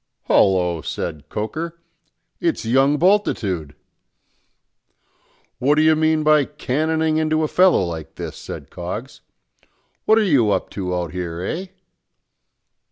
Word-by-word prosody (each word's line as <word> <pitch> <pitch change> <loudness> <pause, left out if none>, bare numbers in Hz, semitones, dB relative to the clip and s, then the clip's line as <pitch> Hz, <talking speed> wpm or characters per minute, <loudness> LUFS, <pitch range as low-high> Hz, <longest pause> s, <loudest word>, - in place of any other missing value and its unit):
"Hallo!" 90 -4 +2
said 75 -1 -5
Coker, 160 +11 -4 0.6
"it's 335 - -1
young 135 +5 +3
Bultitude!" 115 - +1 1.8
"What 140 +4 +3
do 155 - +3
you 160 0 +5
mean 155 0 +2
by 150 -1 +5
cannoning 160 +5 -1
into 155 0 +1
a - - +1
fellow 180 - +4
like 80 -3 -6
this?" - - -6
said - - -9
Coggs. - - -6 0.8
"What 220 - +5
are 225 - +4
you 140 - +3
up - - -1
to 90 -3 -3
out 85 -3 -3
here, 90 -2 -5
eh?" 175 - -4
145 Hz, 125 wpm, -21 LUFS, -, 1.8 s, you